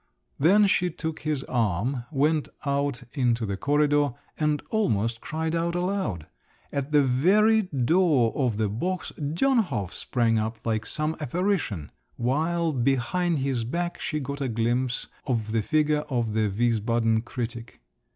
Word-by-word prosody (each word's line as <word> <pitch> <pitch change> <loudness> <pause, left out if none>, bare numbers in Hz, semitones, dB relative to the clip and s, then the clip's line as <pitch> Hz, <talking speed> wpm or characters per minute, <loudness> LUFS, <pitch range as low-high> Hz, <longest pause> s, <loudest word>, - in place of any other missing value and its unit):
Then 195 +9 +5
she 180 -2 +2
took 160 -1 -5
his 150 -3 -2
arm, 120 +2 -1
went 150 +1 +1 0.2
out 140 -2 -1
into 120 -5 +1
the 100 -1 -2
corridor, 145 +4 +2 0.2
and 150 -1 0
almost 115 - 0
cried 160 +1 -3
out 170 +1 0
aloud. 175 - -1 0.5
At 140 +1 -3
the 145 -1 +5
very 200 - +4
door 150 - +2
of 125 -6 0
the 110 -1 +1
box 175 - -3
Dönhof 155 - +1
sprang 115 -3 +1
up 110 +1 -2
like 110 -1 -1
some 155 +1 -1
apparition; 155 - -1 0.2
while 160 +7 0
behind 135 +7 +1
his 135 -4 -1
back 175 +9 -3
she 155 - -2
got 140 +1 -5
a 135 - 0
glimpse 120 +2 0 0.2
of 115 -5 -1
the 115 0 +1
figure 150 +4 +2
of 120 -5 -1
the 110 -1 +1
Wiesbaden 115 +1 +1
critic. 120 -1 -6
135 Hz, 140 wpm, -26 LUFS, 115-160 Hz, 0.5 s, Then